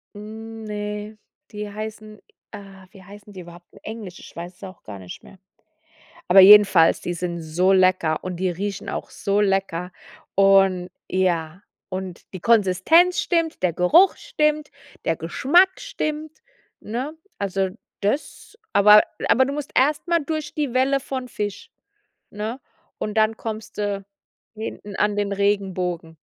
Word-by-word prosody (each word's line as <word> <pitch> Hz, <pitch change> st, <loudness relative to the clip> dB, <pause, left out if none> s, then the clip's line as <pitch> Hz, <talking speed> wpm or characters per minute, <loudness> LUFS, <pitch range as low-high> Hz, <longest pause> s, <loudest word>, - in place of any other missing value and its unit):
Hm, 220 Hz, +2 st, -9 dB
ne. 210 Hz, 0 st, -5 dB, 0.3 s
Die 210 Hz, -1 st, -6 dB
heißen 215 Hz, 0 st, -8 dB, 0.3 s
ah, 195 Hz, -1 st, -12 dB
wie 195 Hz, -2 st, -15 dB
heißen 205 Hz, +2 st, -14 dB
die 185 Hz, -, -9 dB
überhaupt? 175 Hz, 0 st, -14 dB
In -, -, -17 dB
Englisch, 215 Hz, -5 st, -8 dB
ich -, -, -14 dB
weiß 175 Hz, +2 st, -8 dB
es 180 Hz, -, -18 dB
auch 190 Hz, -1 st, -10 dB
gar 100 Hz, -2 st, -9 dB
nicht 90 Hz, -1 st, -10 dB
mehr. -, -, -16 dB, 0.9 s
Aber 190 Hz, +2 st, +7 dB
jedenfalls, 195 Hz, -4 st, +7 dB
die 175 Hz, -, -4 dB
sind 170 Hz, 0 st, -4 dB
so 175 Hz, +4 st, +1 dB
lecker 185 Hz, -4 st, +3 dB
und 185 Hz, -1 st, -4 dB
die 185 Hz, +1 st, -1 dB
riechen 195 Hz, +3 st, -5 dB
auch -, -, -5 dB
so 200 Hz, +1 st, -1 dB
lecker. 195 Hz, -3 st, -1 dB, 0.4 s
Und 195 Hz, -2 st, +4 dB, 0.2 s
ja 175 Hz, -1 st, -1 dB, 0.3 s
und 185 Hz, -2 st, -7 dB
die 185 Hz, -, -6 dB
Konsistenz 230 Hz, -, +4 dB
stimmt, 330 Hz, -, -1 dB
der 180 Hz, -2 st, +2 dB
Geruch 180 Hz, -, +5 dB
stimmt, 300 Hz, -10 st, -1 dB, 0.4 s
der 165 Hz, -, +1 dB
Geschmack 345 Hz, -, +2 dB
stimmt, 310 Hz, -10 st, -5 dB, 0.4 s
ne? 255 Hz, +8 st, -5 dB, 0.2 s
Also 195 Hz, -1 st, -1 dB, 0.3 s
das 285 Hz, -, -3 dB
aber 210 Hz, +1 st, +7 dB, 0.3 s
aber 260 Hz, +3 st, +5 dB
du 275 Hz, -, -3 dB
musst 290 Hz, 0 st, -5 dB
erst 295 Hz, +5 st, +2 dB
mal 340 Hz, 0 st, +3 dB
durch 310 Hz, 0 st, -4 dB
die 290 Hz, -5 st, -2 dB
Welle 270 Hz, +2 st, +2 dB
von 260 Hz, -1 st, -5 dB
Fisch, 205 Hz, -4 st, -5 dB, 0.6 s
ne? 220 Hz, +5 st, -5 dB, 0.4 s
Und 210 Hz, -, -4 dB
dann 220 Hz, 0 st, +2 dB
kommst 220 Hz, -2 st, -7 dB
du 200 Hz, -1 st, -2 dB, 0.5 s
hinten 210 Hz, -2 st, -7 dB
an 210 Hz, 0 st, +1 dB
den 205 Hz, -1 st, -1 dB
Regenbogen. 185 Hz, -5 st, -1 dB
205 Hz, 150 wpm, -22 LUFS, 185-230 Hz, 0.9 s, Aber